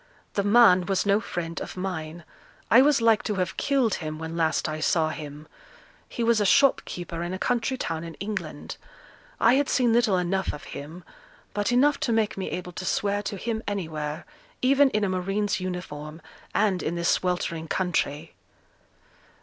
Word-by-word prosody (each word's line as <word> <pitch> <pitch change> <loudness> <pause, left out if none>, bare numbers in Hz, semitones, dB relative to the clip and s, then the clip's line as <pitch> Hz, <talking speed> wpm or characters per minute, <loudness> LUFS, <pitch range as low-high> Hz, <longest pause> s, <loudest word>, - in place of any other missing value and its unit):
'The 200 - +1
man 205 -3 +6
was 195 0 +1
no 200 +1 +3
friend 170 -6 -5
of - - -7
mine; 170 -3 -5 0.5
I 235 - +8
was 285 -2 +4
like 225 -2 +5
to 210 - -2
have 185 -1 -2
killed 265 -7 +1
him 155 -1 -4
when 160 +1 -6
last 165 -1 +1
I 155 0 -4
saw 160 0 +2
him. 150 -1 -8 0.6
He 235 - -3
was 230 -2 +3
a - - +4
shopkeeper 180 -7 +2
in 175 +2 -3
a - - -4
country 245 +5 0
town 165 -8 -3
in 165 -1 -8
England. 210 +1 -5 0.6
I 230 - +5
had 280 +1 +2
seen 245 -3 +3
little 225 -5 +3
enough 190 +2 -1
of 150 - -8
him; 160 +5 -8 0.5
but 205 +2 0
enough 280 +4 +3
to 235 - -1
make 220 -2 +1
me 190 - -4
able 180 0 -5
to 180 - -7
swear 205 +2 0
to 200 0 -4
him 220 +2 -3
anywhere, 160 -6 -4 0.4
even 275 +2 +5
in 215 -3 0
a 200 - +1
marine's 195 +3 -1
uniform, 160 -4 -6 0.4
and 200 -3 +2
in 165 - -2
this 170 0 0
sweltering 175 -3 -1
country.' 160 -4 -1
185 Hz, 175 wpm, -26 LUFS, 165-220 Hz, 0.6 s, I